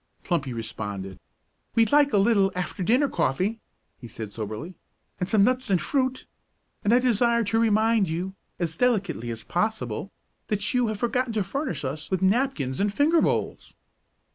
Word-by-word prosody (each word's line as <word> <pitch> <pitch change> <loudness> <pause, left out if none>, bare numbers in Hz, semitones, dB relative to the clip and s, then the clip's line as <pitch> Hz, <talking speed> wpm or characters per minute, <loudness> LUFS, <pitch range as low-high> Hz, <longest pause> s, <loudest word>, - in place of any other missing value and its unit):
Plumpy 150 -7 -1
responded. 100 -4 -5 0.6
"We'd 225 -2 +3
like 290 -1 +5
a - - +3
little 200 -1 +4
after 180 +2 -4
dinner 250 +10 +3
coffee," 195 - 0 0.4
he 120 - -9
said 110 -2 -7
soberly, 110 - -5 0.5
"and 180 - -2
some 205 -1 +4
nuts 255 +2 +1
and 190 -3 +3
fruit; 260 - -1 0.6
and 205 - +2
I 240 - +6
desire 235 -1 +2
to 225 +2 +1
remind 220 -3 +3
you, 180 +4 -3 0.2
as 165 -2 -2
delicately 190 - 0
as 115 -1 -5
possible, 215 +1 -2 0.4
that 210 -1 -1
you 250 -2 +2
have 215 -1 -2
forgotten 245 +1 0
to 215 -2 +1
furnish 185 - -3
us 150 +4 -4
with 190 -1 -1
napkins 190 - +1
and 205 0 +1
finger 305 +9 +3
bowls." - - -1
200 Hz, 165 wpm, -25 LUFS, 160-235 Hz, 0.6 s, I